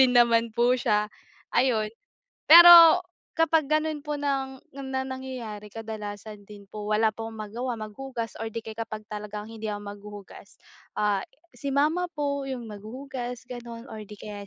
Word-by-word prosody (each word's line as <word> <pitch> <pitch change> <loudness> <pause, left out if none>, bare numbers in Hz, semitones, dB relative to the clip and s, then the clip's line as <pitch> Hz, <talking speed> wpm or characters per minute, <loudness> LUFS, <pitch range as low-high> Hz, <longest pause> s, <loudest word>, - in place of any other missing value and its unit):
din 255 -1 +5
naman 235 -1 +4
po 240 +1 +4
siya, 210 -4 0 0.4
ayon. 225 -4 +1 0.5
Pero, 340 0 +10 0.3
kapag 325 -2 +2
gano'n 310 +1 0
po 295 0 -5
ng 270 -2 -3 0.2
na 265 -1 -3
nangyayari 260 -5 -7
kadalasan 210 -1 -8
din 200 -2 -14
po, 210 -1 -7
wala 215 +1 +2
po 225 +1 -7
akong 225 - -8 0.2
magawa, 245 +3 -3
maghugas, 230 +2 -6
or 225 - -4
di 230 - -4
kaya 220 0 -9
kapag 220 -1 -5
talagang 210 0 -6
hindi 220 -1 -7
ako 205 -1 -4
maghuhugas, 205 0 -11 0.4
ah, 205 -1 +1 0.3
si 280 -2 -5
Mama 310 +6 +2
po 280 -2 -2
yung 245 -4 -6
maghuhugas 245 +3 -7
gano'n 240 0 -8
or 215 -1 -8
'di 210 - -10
kaya, 205 -1 -8
230 Hz, 160 wpm, -26 LUFS, 210-270 Hz, 0.5 s, Pero